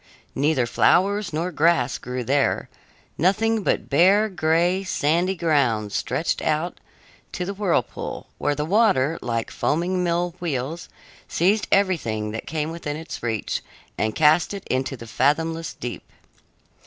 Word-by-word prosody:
Neither 140 -2 +1
flowers 195 - +2
nor 165 +4 -2
grass 160 -5 +2
grew 125 0 -4
there; 140 +3 +1 0.5
nothing 220 +6 +2
but - - 0
bare, 195 +9 +4
gray, 175 +2 +1
sandy 175 +1 +1
ground 135 - +1
stretched 160 - -1
out 155 +3 -1 0.5
to 180 - -3
the 200 - -3
whirlpool, 190 - -2
where 145 - 0
the 150 +1 -2
water, 165 - +2
like 115 -2 -2
foaming 180 +4 0
mill 175 0 0
wheels, 160 -1 -3 0.4
seized 200 +5 +1
everything 125 - +1
that 110 - -6
came 155 0 -2
within 150 -3 -5
its 160 +1 -7
reach 115 -3 -2 0.3
and 110 0 -1
cast 160 +5 +4
it 195 - -8
into 130 +1 -1
the 115 - -10
fathomless 160 +7 0
deep. 120 -6 -6
160 Hz, 135 wpm, -23 LUFS, 130-180 Hz, 0.5 s, bare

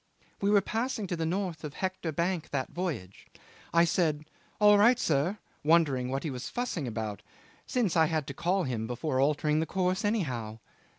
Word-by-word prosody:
'"We 200 - +2
were 205 -1 +5
passing 225 +1 -2
to 180 - -2
the 165 -1 -2
north 180 -3 -2
of 150 -2 -5
the - - -14
Hector 185 -3 -2
Bank 170 +2 -1
that 135 -2 -2
voyage. 140 - -5 0.4
I 170 0 +5
said, 155 -3 +1 0.3
'All 210 -1 +7
right, 235 +4 +6
sir,' 165 - +1 0.3
wondering 145 -6 +3
what 135 +1 -2
he 155 - -2
was 125 -1 -5
fussing 230 - -3
about, 110 -3 -4 0.5
since 230 -9 0
I 160 -1 +5
had 155 -2 -1
to 140 - -6
call 180 +6 0
him 115 -6 -2
before 130 +3 -2
altering 150 +2 +2
the 160 - -1
course 185 0 0
anyhow. 130 - -1
160 Hz, 185 wpm, -29 LUFS, 135-190 Hz, 0.5 s, All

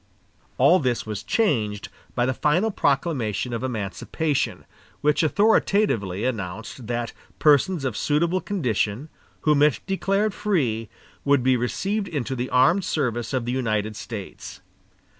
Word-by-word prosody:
All 155 +8 +6
this 125 -4 -1
was 105 -1 -4
changed 105 - 0 0.3
by 120 - +2
the 130 - +1
final 175 - +1
proclamation 135 - 0
of 115 - -3
emancipation, 130 - -2 0.4
which 150 0 +3
authoritatively 155 - +2
announced 110 0 -4
that 120 -1 -2 0.2
persons 150 +1 +3
of 125 -5 -2
suitable 170 +5 +1
condition, 125 - -1 0.3
whom 150 -2 +3
it 150 -2 +4
declared 195 +2 0
free, 125 - 0 0.3
would 140 -3 +3
be 130 0 +4
received 190 - -1
into 135 -5 -3
the 125 +1 -3
armed 160 +10 +4
service 120 -8 -1
of 130 -3 -1
the 120 - -2
United 110 -4 -1
States. 105 -3 -8
130 Hz, 130 wpm, -24 LUFS, 115-165 Hz, 0.4 s, All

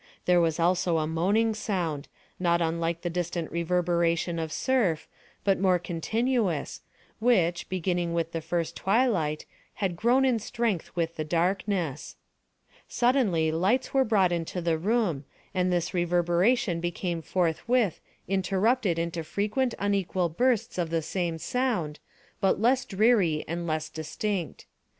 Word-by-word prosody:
There 180 -1 +4
was 165 -1 +1
also 175 0 +2
a 155 - 0
moaning 195 +8 +1
sound, 175 -9 -2 0.3
not 170 -1 +2
unlike 165 0 -1
the 175 - -1
distant 175 -1 -3
reverberation 170 0 0
of 160 -1 -3
surf, 210 -8 0 0.4
but 195 -1 +2
more 185 -1 +3
continuous, 190 - -1 0.4
which, 180 -8 +2
beginning 175 -2 -1
with 165 -1 -1
the 165 - -3
first 165 +1 -2
twilight, 190 -9 +1 0.3
had 190 -4 -1
grown 245 +8 +3
in 250 -3 +2
strength 225 -5 -2
with 165 -1 -2
the 155 - -1
darkness. 175 -1 -1 0.7
Suddenly 220 - +2
lights 190 +11 +1
were 270 -1 +4
brought 200 -6 +3
into 170 +1 -2
the 165 -2 0
room, 195 - 0 0.3
and 180 -1 +1
this 175 +1 -1
reverberation 175 +3 +2
became 175 0 -3
forthwith 185 +5 0 0.3
interrupted 195 +1 +1
into 170 0 -2
frequent 210 - -1
unequal 195 -3 0
bursts 235 +2 0
of 170 -2 -1
the 165 -1 -1
same 170 0 -2
sound, 205 - -1 0.4
but 195 -2 +2
less 250 +4 +2
dreary 195 -7 +2
and 170 +1 -3
less 155 -1 -1
distinct. 165 - -4
175 Hz, 135 wpm, -27 LUFS, 165-210 Hz, 0.7 s, There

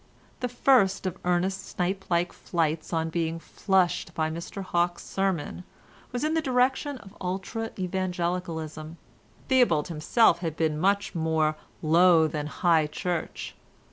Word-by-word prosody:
The 250 - -2
first 240 -6 +3
of 185 - -3
Ernest's 185 +2 0
snipe 190 +2 -1
like 175 0 +1
flights 160 -2 -2
on 165 -1 -1
being 165 0 -1
flushed 180 +1 0
by 160 -1 0
Mr 170 +4 -6
Hawke's 175 -1 0
sermon 190 -3 -2 0.5
was 245 +1 -3
in 310 +1 +1
the 320 - +2
direction 265 +1 +1
of 205 -3 -14
ultra 195 +5 -3
evangelicalism. 175 -4 -3 0.5
Theobald 210 - +3
himself 170 +6 +3
had 165 -3 -4
been 155 -2 0
much 200 +3 +1
more 160 -2 +1 0.3
Low 165 +1 +6
than 150 -1 -3
High 160 +1 +2
Church. 170 +2 -4
175 Hz, 135 wpm, -27 LUFS, 160-195 Hz, 0.5 s, Low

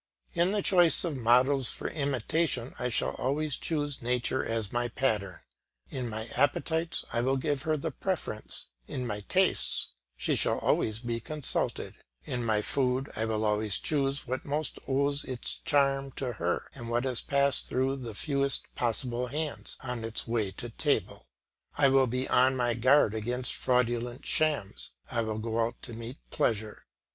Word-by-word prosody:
In 175 +2 +2
the 205 -1 0
choice 175 -3 +6
of 165 -5 -1
models 130 +2 +4
for - - -4
imitation 140 -2 -1
I 125 - -1
shall 115 - +2
always 145 +2 0
choose 145 -3 -1
nature 125 +2 0
as 115 -3 -2
my 120 0 +1
pattern; 110 -7 -1 0.5
in 125 -3 -3
my 110 0 -4
appetites 160 +5 0
I 120 - +1
will 135 +2 +1
give 145 0 -1
her 155 +1 0
the 160 +2 -3
preference; 150 - -3 0.2
in 125 - -4
my 105 -3 -3
tastes - - +2 0.3
she - - +1
shall - - +3
always 110 +1 +1
be 120 -1 -2
consulted; 150 +3 0 0.3
in 125 -1 -2
my 110 -2 +1
food 130 +1 0
I 110 - -1
will 110 -1 -1
always 105 -1 +1
choose 140 -2 0
what 130 +1 -3
most 150 +2 -2
owes 140 +1 +1
its 130 -2 -1
charm 135 -1 +2
to 125 -1 -3
her, 90 -4 -2
and 120 -3 -7
what 120 +1 +1
has 130 -3 +1
passed 140 -1 +1
through 135 +2 0
the 120 -5 -7
fewest 140 +1 0
possible 120 +1 +1
hands 150 +3 -4
on 125 -3 -4
its 115 +1 0
way 115 -4 0
to 120 +5 -7
table. - - -1 0.5
I 140 -2 +5
will 135 -1 +4
be 125 +2 -2
on 130 +1 +4
my 120 -2 +1
guard 130 0 +4
against 120 +3 -2
fraudulent 120 -1 0
shams; 100 - 0 0.2
I 120 - +1
will 110 -1 -2
go 115 +1 -2
out 115 +1 -3
to 120 - -7
meet 115 +4 -7
pleasure. 110 -7 -1
125 Hz, 170 wpm, -29 LUFS, 115-140 Hz, 0.5 s, choice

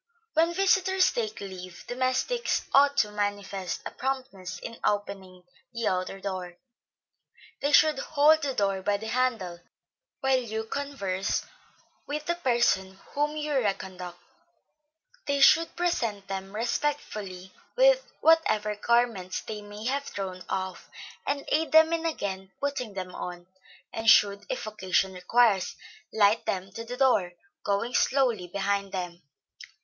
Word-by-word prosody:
When 330 +2 +3
visitors 380 0 +3
take 220 -3 -3
leave, 185 -3 -8
domestics 255 - 0
ought 285 +1 +5
to 210 - +3
manifest 205 -2 -3
a - - -4
promptness 255 -9 -4
in 230 +6 -8
opening 195 -3 -2 0.3
the 230 -1 -1
outer 185 +1 -1
door; 185 -3 -5 1.0
they 285 - +1
should 305 0 +5
hold 310 +1 +4
the 275 -3 -2
door 195 -1 +1
by 205 +1 +1
the 220 +2 -6
handle, 225 -9 0 0.6
while 265 -1 +3
you 220 -2 -4
converse 220 -7 -2 0.6
with 295 +1 -3
the 345 - +1
person 235 - +1
whom 295 +1 -1
you 300 0 -2
reconduct; 190 -7 -2 1.1
they 280 0 +1
should 320 +4 +5
present 230 - -1
them 195 +1 -5
respectfully 210 -7 -3 0.2
with - - +5 0.2
whatever 215 -11 +3
garments 230 -4 +1
they 210 -1 -6
may 205 +1 -9
have 275 +3 -1
thrown 185 -5 -5
off, 190 -1 -4 0.4
and 285 0 -1
aid 320 +1 +1
them 320 +1 +6
in 330 0 0
again 190 -10 -4
putting 275 -6 -3
them 185 -1 -5
on; 175 -1 -6 0.5
and 225 0 +1
should, 200 -2 +5
if - - -3
occasion 190 -2 0
requires, 195 +2 +2 0.4
light 215 +1 +3
them 190 0 -2
to 230 +4 -6
the 245 +2 -7
door, 225 -10 +3 0.3
going 205 +4 -1
slowly 245 -11 +2
behind 200 +1 -1
them. 180 -2 -5
215 Hz, 135 wpm, -27 LUFS, 190-280 Hz, 1.1 s, them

